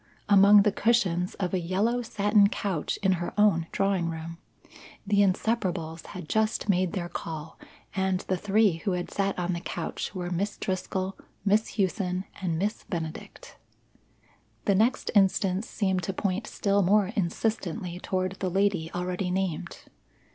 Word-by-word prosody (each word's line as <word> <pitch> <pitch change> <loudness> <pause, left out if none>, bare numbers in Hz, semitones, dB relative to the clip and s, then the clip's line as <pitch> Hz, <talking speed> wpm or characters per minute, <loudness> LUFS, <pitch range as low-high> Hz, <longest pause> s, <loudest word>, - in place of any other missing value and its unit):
Among 200 0 +7
the 210 - +3
cushions 190 -6 +1
of 185 -3 -3
a 185 - +2
yellow 200 +8 0
satin 205 -2 +3
couch 190 -7 -2
in 190 - +4
her 175 - -4
own 175 -6 +4
drawing 195 -4 +1
room. 165 +1 -6 0.7
The 205 0 +2
Inseparables 185 -5 0
had 180 -5 -8
just 220 +2 0
made 185 -3 +2
their 175 -2 -2
call 160 -2 -7 0.4
and 190 -1 +1
the 190 - -1
three 205 -1 +2
who 190 +3 -2
had 180 0 -3
sat 195 -1 -1
on 180 0 -1
the 170 - -2
couch 170 +3 -5
were 180 -1 -3
Miss 200 +4 -2
Driscoll, 190 0 -3 0.3
Miss 210 +2 +2
Hughson, 185 -2 0 0.2
and 170 -4 -1
Miss 205 +5 -2
Benedict. 165 -3 -6 1.1
The 200 - +4
next 225 +6 +2
instance 195 0 +2
seemed 190 -3 0
to 195 - -3
point 195 +2 -2
still 200 0 +1
more 200 +1 +3
insistently 185 -1 -2
toward 185 0 -2
the 185 - -1
lady 190 -3 +1
already 180 +1 -2
named. 185 -3 -2
190 Hz, 150 wpm, -27 LUFS, 175-205 Hz, 1.1 s, Among